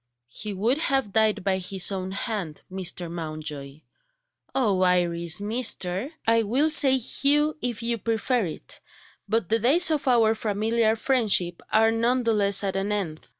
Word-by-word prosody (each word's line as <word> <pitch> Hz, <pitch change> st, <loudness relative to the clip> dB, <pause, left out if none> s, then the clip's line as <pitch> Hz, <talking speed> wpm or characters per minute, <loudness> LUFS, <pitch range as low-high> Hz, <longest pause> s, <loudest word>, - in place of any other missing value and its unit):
"He 210 Hz, -, -6 dB
would 225 Hz, +9 st, 0 dB
have 270 Hz, -, -1 dB
died 220 Hz, -3 st, +1 dB
by 190 Hz, -1 st, 0 dB
his 190 Hz, +1 st, +1 dB
own 190 Hz, -1 st, -4 dB
hand, 195 Hz, -6 st, -5 dB
Mr. 185 Hz, -2 st, -3 dB
Mountjoy 155 Hz, -3 st, -7 dB, 0.3 s
" -, -, -43 dB
"Oh, 210 Hz, -8 st, +1 dB
Iris 175 Hz, -2 st, +2 dB
'Mr.!'" 210 Hz, -1 st, -1 dB, 0.2 s
"I 230 Hz, 0 st, +3 dB
will 260 Hz, +9 st, +1 dB
say 270 Hz, -3 st, +5 dB
'Hugh,' 290 Hz, +4 st, 0 dB
if 240 Hz, -2 st, -3 dB
you 235 Hz, 0 st, -2 dB
prefer 230 Hz, +1 st, -1 dB
it 155 Hz, -, -9 dB, 0.5 s
but 220 Hz, -4 st, -1 dB
the 225 Hz, -, +3 dB
days 315 Hz, +9 st, +4 dB
of 300 Hz, -2 st, -2 dB
our 230 Hz, -3 st, +4 dB
familiar 220 Hz, +1 st, 0 dB
friendship 215 Hz, -8 st, +1 dB
are 225 Hz, +1 st, +4 dB
none 240 Hz, +3 st, 0 dB
the 230 Hz, -1 st, +1 dB
less 200 Hz, -1 st, +2 dB
at 195 Hz, -1 st, -2 dB
an 195 Hz, +2 st, -2 dB
end. 180 Hz, -7 st, -4 dB
215 Hz, 160 wpm, -24 LUFS, 185-240 Hz, 0.5 s, say